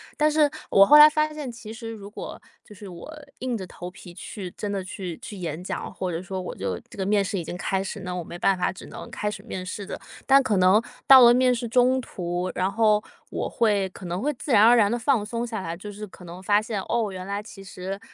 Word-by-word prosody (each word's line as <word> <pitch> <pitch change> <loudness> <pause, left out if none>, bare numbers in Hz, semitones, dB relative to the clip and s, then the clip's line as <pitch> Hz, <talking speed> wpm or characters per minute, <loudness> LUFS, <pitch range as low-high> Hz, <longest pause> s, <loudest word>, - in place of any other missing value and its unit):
但 305 0 +3
是 300 -1 +4 0.2
我 195 - +7
后 295 +7 +8
来 300 0 +11
发 305 0 0
现， 295 -4 -5
其 230 -2 -10
实 230 0 -7
如 215 -3 -8
果， - - -8 0.2
就 210 - -15
是 205 0 -10
我 180 - -10 0.3
硬 250 -2 -2
着 190 - -6
头 175 0 -8
皮 180 -1 -12
去 185 +1 -7
真 205 +2 -5
的 200 -1 -2
去 185 -2 -6
去 240 -3 -9
演 170 -3 -4
讲， - - -5
或 185 - -3
者 165 0 -3
说 190 0 -5
我 180 - -6
就 - - -3
这 - - -13
个 190 - -2
面 205 0 +2
试 195 +1 -3
已 175 - -3
经 175 - -6
开 190 +1 -1
始， 195 - -5
那 180 -1 -5
我 180 - -3
没 170 - -9
办 195 +1 +3
法 180 - 0
只 185 - -11
能 - - -9
开 210 - -2
始 210 -1 -7
面 185 -2 -6
试 200 +2 -5
着， - - -6 0.3
但 275 0 +6
可 220 -6 0
能 185 +4 +5 0.3
到 265 -1 +10
了 240 -1 +8
面 250 0 +4
试 240 0 -3
中 250 +3 +3
途， 180 -4 -4
然 185 +2 0
后， 215 0 +3 0.3
我 - - -3
会 205 -4 +1
可 185 - -11
能 175 +2 -3
会 295 +4 0
自 275 +2 -6
然 205 - +7
而 235 +2 +7
然 210 -4 +4
地 240 - 0
放 240 -3 +1
松 230 +2 -3
下 225 -4 -4
来， 165 -2 -4
就 205 +4 -8
是 210 +1 -7
可 185 - -15
能 175 +2 -9
发 205 +2 +3
现， 215 -3 -3
哦， 225 -2 -1
原 185 -1 -7
来 200 +1 -3
其 200 -2 -12
实， 190 0 -6
205 Hz, 285 characters per minute, -25 LUFS, 185-235 Hz, 0.3 s, 来